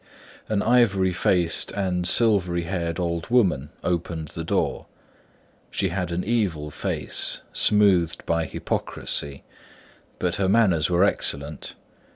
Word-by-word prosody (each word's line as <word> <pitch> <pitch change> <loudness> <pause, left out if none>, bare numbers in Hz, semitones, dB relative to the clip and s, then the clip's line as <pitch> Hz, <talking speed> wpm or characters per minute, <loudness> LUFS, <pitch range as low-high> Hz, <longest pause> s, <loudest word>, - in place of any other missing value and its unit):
An 105 -2 +1
ivory 100 -6 +3
faced 85 -1 +1
and 90 -3 -1
silvery 90 -7 +3
haired 85 -1 -3
old 85 0 -2
woman 95 - +2
opened 85 -3 -2
the 85 - -6
door. 80 - -1 0.8
She 95 - -1
had 90 0 -3
an 85 +2 -2
evil 95 -10 -1
face, - - -3
smoothed 95 -6 +3
by 85 -1 0
hypocrisy: 70 -2 -3 0.7
but - - -1
her 95 -1 +1
manners 95 -8 +3
were 90 +1 +3
excellent. 75 -6 -2
90 Hz, 120 wpm, -24 LUFS, 85-100 Hz, 0.8 s, ivory